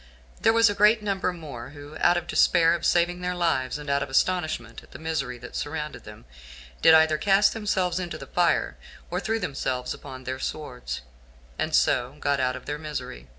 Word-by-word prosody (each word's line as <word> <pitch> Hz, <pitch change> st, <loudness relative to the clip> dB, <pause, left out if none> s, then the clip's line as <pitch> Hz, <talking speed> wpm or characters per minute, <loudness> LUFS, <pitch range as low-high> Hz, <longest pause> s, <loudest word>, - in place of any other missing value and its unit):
There -, -, +5 dB
was 230 Hz, 0 st, +5 dB
a 205 Hz, -, +1 dB
great 210 Hz, +2 st, +4 dB
number 195 Hz, -3 st, 0 dB
more, 145 Hz, -8 st, -8 dB
who, 145 Hz, +1 st, -10 dB
out 175 Hz, 0 st, +4 dB
of 175 Hz, -, -3 dB
despair 165 Hz, -2 st, +4 dB
of 170 Hz, -1 st, 0 dB
saving 175 Hz, +1 st, +2 dB
their 180 Hz, 0 st, -2 dB
lives, 160 Hz, -7 st, 0 dB
and 150 Hz, 0 st, -9 dB
out 140 Hz, 0 st, +1 dB
of -, -, -3 dB
astonishment 155 Hz, -6 st, 0 dB
at -, -, -19 dB
the -, -, -8 dB
misery 150 Hz, -6 st, -3 dB
that 120 Hz, +1 st, -11 dB
surrounded 150 Hz, -4 st, -4 dB
them, 105 Hz, -, -12 dB, 0.6 s
did 160 Hz, -, +8 dB
either 160 Hz, -1 st, +4 dB
cast 200 Hz, +3 st, +4 dB
themselves 190 Hz, -5 st, 0 dB
into 175 Hz, -2 st, -4 dB
the -, -, -9 dB
fire, -, -, +1 dB, 0.3 s
or -, -, -1 dB
threw 225 Hz, +1 st, -1 dB
themselves 130 Hz, -7 st, -2 dB
upon 130 Hz, -2 st, -10 dB
their 130 Hz, 0 st, -4 dB
swords, 130 Hz, -5 st, -5 dB, 0.6 s
and -, -, 0 dB
so 120 Hz, -, +2 dB
got 140 Hz, -1 st, 0 dB
out 130 Hz, -1 st, +1 dB
of -, -, -9 dB
their 145 Hz, 0 st, -4 dB
misery. 150 Hz, -, -6 dB
155 Hz, 195 wpm, -26 LUFS, 130-180 Hz, 0.6 s, did